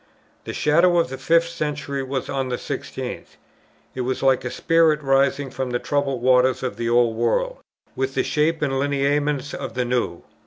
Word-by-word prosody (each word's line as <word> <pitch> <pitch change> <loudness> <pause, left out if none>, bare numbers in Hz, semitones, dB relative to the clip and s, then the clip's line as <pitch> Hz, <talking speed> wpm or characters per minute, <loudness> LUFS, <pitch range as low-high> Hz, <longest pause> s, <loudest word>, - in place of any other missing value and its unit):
The - - -4
shadow 170 +4 +3
of 165 -6 +2
the 130 - -6
fifth 170 0 +3
century 150 -4 -3
was 135 0 -3
on 135 -2 -2
the 125 - -1
sixteenth. - - -6 0.6
It 130 - -4
was 130 +2 -2
like 135 -2 +3
a 125 - -3
spirit 165 +2 +3
rising 135 0 +2
from 130 -1 -3
the 120 - 0
troubled 135 -2 -1
waters 130 0 +3
of 130 - -2
the 115 0 -2
old 120 -1 +3
world, - - 0 0.4
with 130 +1 -2
the - - +2
shape 155 +1 0
and 135 -2 0
lineaments 145 +1 0
of 115 - -6
the 125 -1 0
new. 120 -8 -1
135 Hz, 185 wpm, -22 LUFS, 125-150 Hz, 0.6 s, shadow